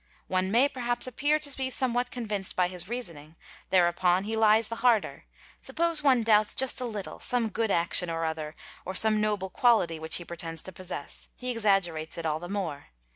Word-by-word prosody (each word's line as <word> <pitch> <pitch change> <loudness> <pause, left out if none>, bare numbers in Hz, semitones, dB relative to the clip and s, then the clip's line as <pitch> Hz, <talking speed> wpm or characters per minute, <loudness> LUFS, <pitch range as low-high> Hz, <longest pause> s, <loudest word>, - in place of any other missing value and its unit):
One 185 0 -1
may 240 +7 +4
perhaps 245 -3 -2
ppear 290 +5 0
to 285 -2 0
be 265 -1 -2
somewhat 245 -1 0
convinced 210 -6 -4
by 180 -1 +1
his 180 +1 -3
reasoning; 170 -11 -6 0.3
thereupon 180 0 +2
he 220 +2 -3
lies 220 0 +4
the 230 - -6
i 240 -3 +5
sder - - -11 0.4
Suppose 335 -2 0
one 260 -5 +3
doubts 215 -1 +3
just 265 -1 +2
a - - -2
little 210 -5 -6
some 240 -3 0
good 225 0 -1
action 170 -1 +3
or 165 0 -2
other 160 -1 -4 0.3
or 190 - -6
'some 215 +1 +3
noble 205 -3 -1
quality 215 -10 +2
which 160 0 +2
he 175 - +2
pretends 165 -1 -6
to 190 - -8
possess, 180 -5 -7
he 250 0 -4
exaggerates 195 -9 0
it 165 - -5
all 155 0 -1
be 175 - -8
the - - -9
more. 185 -8 -4
205 Hz, 200 wpm, -27 LUFS, 175-240 Hz, 0.4 s, i